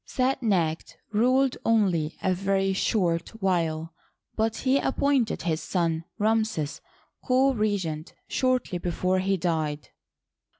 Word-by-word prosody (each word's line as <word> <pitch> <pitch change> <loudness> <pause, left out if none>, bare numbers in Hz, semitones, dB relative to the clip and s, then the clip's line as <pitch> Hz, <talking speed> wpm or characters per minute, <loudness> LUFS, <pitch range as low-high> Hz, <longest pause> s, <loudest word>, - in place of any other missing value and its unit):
Set 260 +1 0
necht 175 -8 0 0.2
ruled 255 +4 +2
only 185 -9 +1
a 185 - +2
very 195 +1 0
short 175 -4 0
while, 165 -4 0 0.4
but 220 0 0
he 270 +1 +2
ap 270 - -2
pointed 275 -5 +1
his 160 -2 -1
son, 165 -3 -1
Ramses, 215 -8 0 0.4
co 265 +1 +3
regent 190 -8 -2
shortly 255 -8 0
before 185 +2 0
he 195 +1 +1
died. 160 -4 -2
195 Hz, 120 wpm, -26 LUFS, 165-225 Hz, 0.4 s, co